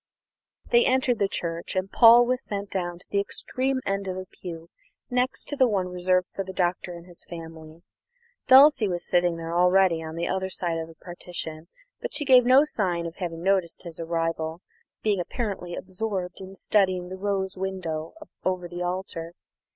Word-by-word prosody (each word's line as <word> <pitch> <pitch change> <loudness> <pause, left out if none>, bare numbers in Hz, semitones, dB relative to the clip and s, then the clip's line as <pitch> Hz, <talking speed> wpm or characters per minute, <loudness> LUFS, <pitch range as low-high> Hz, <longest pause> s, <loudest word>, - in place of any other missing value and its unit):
They 240 0 +6
entered 255 -2 +2
the 200 - +3
church, 170 -2 -4
and 185 +1 -1
Paul 235 +1 +8
was 255 +1 0
sent 200 -1 -5
down 175 -2 -2
to 180 - -14
the 200 - +2
extreme 260 +6 -2
end 195 0 -1
of 185 0 -3
a 185 - -5
pew 170 -2 -9 0.4
next 250 +1 0
to 290 - -1
the 260 -3 +4
one 190 -5 0
reserved 180 0 +1
for 195 - -3
the 190 - -7
Doctor 180 -1 -1
and 170 0 -11
his 175 -1 -10
family. 165 -1 -10 0.6
Dulcie 265 -3 +7
was 175 -2 -2
sitting 175 -1 +2
there 165 0 -5
already 180 -1 +4
on 160 0 -7
the 170 +1 -2
other 190 0 -1
side 170 -3 -2
of 160 - -5
the 165 - -14
partition; 170 -2 -7 0.3
but - - -5
she 295 0 0
gave 255 -2 +7
no 260 +3 +7
sign 180 - -1
of 170 0 -7
having 170 -2 -5
noticed 190 -3 +1
his 170 -2 -8
arrival, 165 0 -2 0.4
being 210 -3 +2
apparently 180 -2 -4
absorbed 190 -1 -4
in 190 0 -9
studying 185 -3 +1
the 190 - -5
rose 195 0 -2
window 185 -4 -4 0.3
over 185 -1 -1
the 175 +1 -7
altar. 175 -2 -4
185 Hz, 180 wpm, -26 LUFS, 170-200 Hz, 0.6 s, Paul